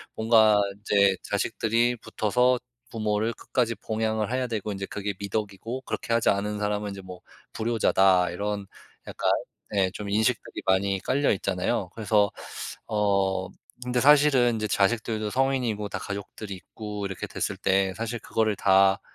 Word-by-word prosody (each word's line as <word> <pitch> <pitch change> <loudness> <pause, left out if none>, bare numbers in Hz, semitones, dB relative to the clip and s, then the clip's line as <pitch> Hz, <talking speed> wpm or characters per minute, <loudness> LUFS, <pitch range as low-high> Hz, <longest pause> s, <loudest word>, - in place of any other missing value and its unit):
뭔가 110 -2 +5 0.2
인제 100 -1 +3
자식들이 115 +2 0
붙어서 125 +4 +1 0.3
부모를 110 0 -1
끝까지 115 -1 -1
봉양을 110 -1 -2
해야 130 0 0
되고, 110 -3 -3
인제 100 -1 -4
그게 105 0 -4
미덕이고, 105 +4 -4
그렇게 115 - -3
하지 115 - +3
않은 105 +1 0
사람은 105 0 -1
인제 100 -1 -7
뭐 90 -1 -10 0.3
불효자다, 95 -5 +3
이런 100 +2 -3 0.4
약간 - - -2 0.4
네, 95 -2 +1
좀 100 +1 -6
인식들이 110 +3 0
많이 95 +1 +2
깔려 140 +8 +1
있잖아요. 95 +1 -1
그래서 105 -2 +2 0.6
어 100 -3 +1 0.3
근데 125 0 0
사실은 140 -3 +5
이제 110 -1 -2
자식들도 110 +1 0
성인이고 125 -5 0
다 - - -4
가족들이 100 0 -6
있고 105 +2 -7
이렇게 95 -2 -5
됐을 - - -3
때 95 0 +1
사실 115 +1 -3
그거를 110 -1 0
다 95 0 +4
105 Hz, 330 characters per minute, -26 LUFS, 100-115 Hz, 0.6 s, 뭔가